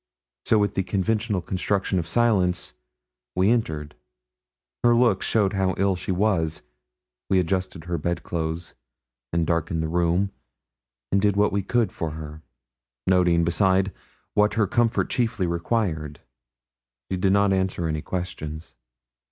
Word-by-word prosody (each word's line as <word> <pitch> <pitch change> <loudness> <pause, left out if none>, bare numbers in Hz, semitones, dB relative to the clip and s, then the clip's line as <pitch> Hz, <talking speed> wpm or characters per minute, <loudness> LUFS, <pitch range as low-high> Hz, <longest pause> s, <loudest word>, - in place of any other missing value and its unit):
So, 110 - +4
with 105 -2 +1
the 95 - 0
conventional 100 +2 0
construction 95 0 -1
of 85 - -4
silence, 95 - +1 0.6
we 95 +4 +3
entered. 80 -11 -1 0.9
Her 120 0 +5
looks 115 -5 +3
showed 105 -3 +2
how 95 -2 +1
ill 95 0 +2
she 90 - -4
was. 90 -5 0 0.7
We 95 - +3
adjusted 90 -1 -1
her 85 -1 -3
bed 85 +3 -2
clothes, 80 0 -3 0.6
and 85 -1 +1
darkened 85 0 0
the - - -1
room, 85 +4 +1 0.8
and 100 - +3
did 100 -1 +2
what 105 +1 +3
we 100 - 0
could 115 +3 +1
for 80 -2 -4
her 80 -1 -8 0.6
noting, 90 -2 +3
beside, 95 +2 +2 0.4
what 105 0 +3
her 110 -2 +3
comfort 120 +2 +1
chiefly 115 -5 0
required. 85 -4 -1 0.9
She - - +1
did 95 +1 +2
not 100 0 +4
answer 95 -3 0
any 80 -1 -2
questions. 80 -4 -5
95 Hz, 140 wpm, -24 LUFS, 85-100 Hz, 0.9 s, Her